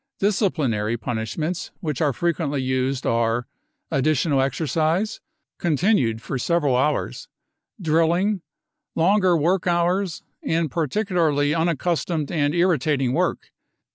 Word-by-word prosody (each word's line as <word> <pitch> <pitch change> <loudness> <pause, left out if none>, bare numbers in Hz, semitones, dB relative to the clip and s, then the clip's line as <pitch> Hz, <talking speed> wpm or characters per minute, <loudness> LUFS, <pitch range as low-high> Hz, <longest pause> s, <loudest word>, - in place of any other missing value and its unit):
Disciplinary 145 - 0
punishments 120 +10 -3
which 150 -6 -3
are 150 -3 +3
frequently 150 0 -1
used 130 0 -1
art: 115 +1 +1 0.5
additional 140 0 +2
exercise, 160 - 0 0.4
con 165 -4 +1
tinued 130 - +2
for 135 - -4
several 150 -2 +1
hours, 145 +4 -1 0.5
drilling, 170 +4 +2 0.5
longer 185 +1 +3
work 175 +4 +1
hours, 175 +1 0 0.2
and 160 -3 0
particularly 160 -3 +1
unaccustomed 165 -1 -1
and 150 -1 +1
irritating 150 -7 +2
wo^k. - - -1
155 Hz, 105 wpm, -23 LUFS, 135-175 Hz, 0.5 s, are